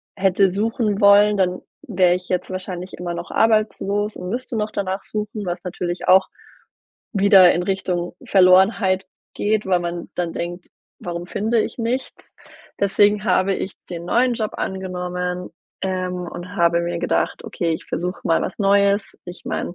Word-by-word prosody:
hätte 190 0 +3
suchen 215 +1 -1
wollen, 205 +1 +6
dann 180 -1 0 0.2
wäre 185 -4 +2
ich 180 0 -7
jetzt 180 0 -1
wahrscheinlich 185 -1 -6
immer 175 0 -4
noch 170 +1 -6
arbeitslos 215 -1 +1
und 180 0 -6
müsste 240 +1 -4
noch 210 0 -2
danach 190 0 -3
suchen, 210 0 -5
was 175 -1 -4
natürlich 175 0 -4
auch 190 +1 +6 0.9
wieder 195 -3 +6
in 175 - 0
Richtung 180 -2 -2
Verlorenheit 190 0 +4 0.3
geht, 215 0 0
weil 180 -2 +2
man 175 0 -5
dann 175 -2 -2
denkt: 175 +1 -5 0.3
„Warum 175 0 -5
finde 220 +5 0
ich - - -4
nichts?“ 240 +3 -3 0.6
Deswegen 205 +1 +3
habe 195 -2 +2
ich 190 - -4 0.2
den 170 -1 -6
neuen 245 +5 +2
Job 220 -2 -3
angenommen, 180 -1 -4 0.3
ähm, 185 -1 -2
und 180 +3 -8
habe 170 0 +3
mir 170 0 -2
gedacht: - - -1
„Okay, 170 -2 -2
ich 160 - -5
versuche 180 +2 -3
mal 165 - +2
was - - -5
Neues.“ 200 0 +2
Ich 175 0 -10
meine, 175 - -3
190 Hz, 160 wpm, -21 LUFS, 180-205 Hz, 0.9 s, wollen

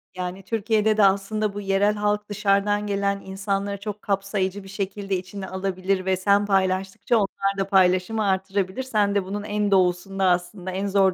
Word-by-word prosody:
Yani 180 +1 -5
Türkiye'de 220 +1 +1
de 215 - +5
aslında 200 +2 +1
bu 205 - -5
yerel 200 +1 +2
halk 210 0 -1
dışarıdan 205 0 +1
gelen 200 0 0
insanları 195 +1 -3
çok 210 0 -6
kapsayıcı 195 -1 -1
bir - - -12
şekilde 195 0 -3
içine 190 +1 -7
alabilir 190 0 -2
ve 190 0 +1
sen 200 +2 +3
paylaştıkça 190 +2 0
onlar 195 -1 -1
da 195 0 -1
paylaşımı 190 +3 +3
artırabilir. 190 +3 -1
Sen 210 -5 +1
de 200 - +2
bunun 200 +2 -5
en 210 -1 -1
doğusunda 190 +1 +2
aslında 180 +1 -1
en 195 +2 -2
zor 195 -1 +3
195 Hz, 165 wpm, -24 LUFS, 190-205 Hz, -, de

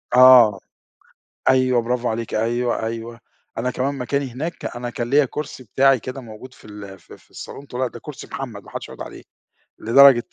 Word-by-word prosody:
آه 125 -5 +8 0.9
أيوه، 130 -2 +3
برافو 125 +1 -1
عليكِ 115 0 -4
أيوه، 120 +1 0
أيوه، 115 +1 -6 0.4
أنا 125 +2 -1
كمان 135 +3 -2
مكاني 135 +1 -2
هناك، 160 +7 -5
أنا 120 0 -5
كان 120 0 -4
ليّا 145 +1 +5
كرسي 135 -1 -6
بتاعي 135 +4 +3
كده 130 +4 -7
موجود 120 +2 -12
في - - -20
ال 100 -2 -10
في - - -15
في - - -27
الصالون، 140 - -10
تقول 125 +1 -4
لك: 130 - -1
"ده - - -9
كرسي 150 +2 -9
محمد، 115 -8 -7
ما - - -14
حدش - - -7
يقعد - - -8
عليه." - - -11 0.6
لدرجة 125 +1 +6
125 Hz, 185 wpm, -21 LUFS, 115-130 Hz, 0.9 s, آه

